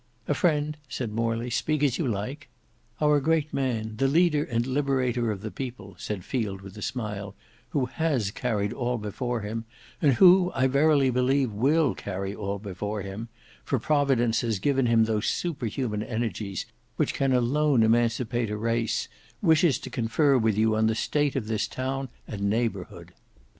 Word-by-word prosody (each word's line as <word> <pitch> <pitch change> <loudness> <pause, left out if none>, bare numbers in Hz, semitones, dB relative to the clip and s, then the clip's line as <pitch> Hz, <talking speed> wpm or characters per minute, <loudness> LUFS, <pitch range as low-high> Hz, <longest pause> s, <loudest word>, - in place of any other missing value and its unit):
"A - - +2
friend," 150 -3 +1
said 120 -3 -3
Morley; 115 +2 -1
"speak 150 +5 0
as 135 -4 +2
you 160 - 0
like." 125 +7 -4 0.5
"Our 150 -1 +4
great 155 +1 +1
man, 110 -5 -2
the 135 - +2
leader 150 0 +3
and 115 -3 -1
liberator 130 -3 0
of 100 -3 -3
the 110 0 -5
people," 120 -7 -7
said 100 -4 -5
Field 105 -7 -2
with 95 0 -11
a 105 - -9
smile, 105 -5 -4 0.3
"who 140 -4 0
has 130 -6 -1
carried 105 -2 -1
all 125 -1 -1
before 115 +3 -3
him, 110 +2 -4 0.4
and 145 -5 +5
who 180 +5 +6
I 130 0 +2
verily 140 0 +4
believe 125 0 +2
will 140 +7 +2
carry 95 0 -4
all 100 -1 -3
before 105 +1 -4
him, 100 +4 -6 0.3
for 135 - 0
Providence 130 -3 +2
has 115 -3 -1
given 135 +4 +1
him 115 -1 +4
those 110 -1 0
superhuman 125 - -2
energies 110 -4 -3 0.3
which - - 0
can 135 -1 +1
alone 130 +1 +3
emancipate 115 0 +1
a 105 - -3
race, 115 0 0 0.3
wishes 160 - +4
to - - -9
confer 125 +5 +2
with 110 -4 +2
you 110 0 +3
on 110 0 +3
the 110 - +1
state 145 +4 0
of 130 -5 -1
this 110 -1 0
town 135 +1 -3 0.2
and 105 -2 -6
neighbourhood. 110 -4 -2
120 Hz, 170 wpm, -26 LUFS, 110-140 Hz, 0.5 s, who